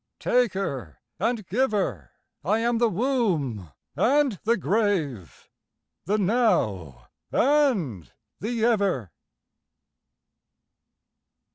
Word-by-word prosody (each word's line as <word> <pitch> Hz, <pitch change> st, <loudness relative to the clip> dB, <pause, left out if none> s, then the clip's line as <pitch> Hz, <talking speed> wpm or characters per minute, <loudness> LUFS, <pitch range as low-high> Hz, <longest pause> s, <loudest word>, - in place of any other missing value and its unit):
Taker 190 Hz, -, -1 dB, 0.2 s
and 230 Hz, -4 st, -1 dB
giver, 195 Hz, -, -1 dB, 0.3 s
I 200 Hz, +8 st, +2 dB
am 230 Hz, 0 st, 0 dB
the 235 Hz, -1 st, +3 dB
womb 180 Hz, -, -1 dB, 0.3 s
and 270 Hz, -, +2 dB
the 230 Hz, +1 st, +3 dB
grave, 180 Hz, -, -1 dB, 0.6 s
The 205 Hz, +5 st, +1 dB
Now 175 Hz, -, 0 dB, 0.3 s
and 220 Hz, -, +1 dB, 0.3 s
the 225 Hz, +1 st, -1 dB
Ever. 195 Hz, -, +1 dB
205 Hz, 80 wpm, -25 LUFS, -, 0.6 s, the